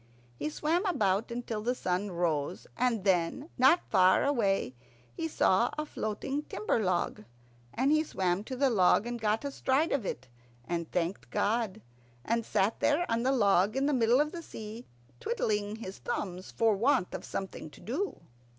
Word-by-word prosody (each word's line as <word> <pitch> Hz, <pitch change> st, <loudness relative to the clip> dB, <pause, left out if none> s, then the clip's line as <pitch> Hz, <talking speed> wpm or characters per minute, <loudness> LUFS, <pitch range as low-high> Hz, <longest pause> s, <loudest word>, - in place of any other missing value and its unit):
He 150 Hz, -, -1 dB
swam 320 Hz, -, 0 dB
about 210 Hz, -, +1 dB
until 235 Hz, -2 st, -4 dB
the 245 Hz, +3 st, 0 dB
sun 185 Hz, -1 st, -1 dB
rose, 170 Hz, -3 st, -1 dB
and 235 Hz, -5 st, +1 dB
then, 190 Hz, -, +1 dB
not 265 Hz, +7 st, +5 dB
far 185 Hz, 0 st, +5 dB
away, 205 Hz, -, +1 dB, 0.4 s
he 160 Hz, -, -3 dB
saw 190 Hz, +7 st, +3 dB
a 305 Hz, -, -1 dB
floating 270 Hz, +3 st, -3 dB
timber 215 Hz, -5 st, -1 dB
log, 185 Hz, -, -1 dB, 0.5 s
and 265 Hz, +4 st, +1 dB
he 310 Hz, 0 st, +4 dB
swam 185 Hz, -, -1 dB
to 260 Hz, -, -5 dB
the 270 Hz, 0 st, +2 dB
log, 195 Hz, 0 st, +4 dB
and 240 Hz, -1 st, -4 dB
got 220 Hz, +4 st, 0 dB
astride 280 Hz, +2 st, +1 dB
of 280 Hz, -5 st, +1 dB
it, 130 Hz, -8 st, -5 dB, 0.4 s
and 170 Hz, -2 st, -3 dB
thanked 175 Hz, +2 st, -2 dB
God. 220 Hz, -1 st, -1 dB, 0.4 s
And 230 Hz, 0 st, +1 dB
he -, -, -17 dB
sat 200 Hz, +4 st, +1 dB
there 305 Hz, +4 st, +2 dB
on 230 Hz, 0 st, +1 dB
the 260 Hz, +2 st, +2 dB
log 205 Hz, -4 st, +3 dB
in 270 Hz, -, +2 dB
the 295 Hz, -, +2 dB
middle 240 Hz, 0 st, +4 dB
of 300 Hz, +1 st, +1 dB
the 340 Hz, -, -6 dB
sea, 220 Hz, -5 st, -9 dB, 0.3 s
twiddling 210 Hz, -3 st, -1 dB
his 195 Hz, -4 st, -8 dB
thumbs 185 Hz, -5 st, -4 dB
for 225 Hz, -2 st, +2 dB
want 210 Hz, -3 st, +2 dB
of -, -, -5 dB
something 190 Hz, -4 st, -5 dB
to -, -, -16 dB
do. 330 Hz, -, -3 dB
220 Hz, 175 wpm, -30 LUFS, 185-260 Hz, 0.5 s, not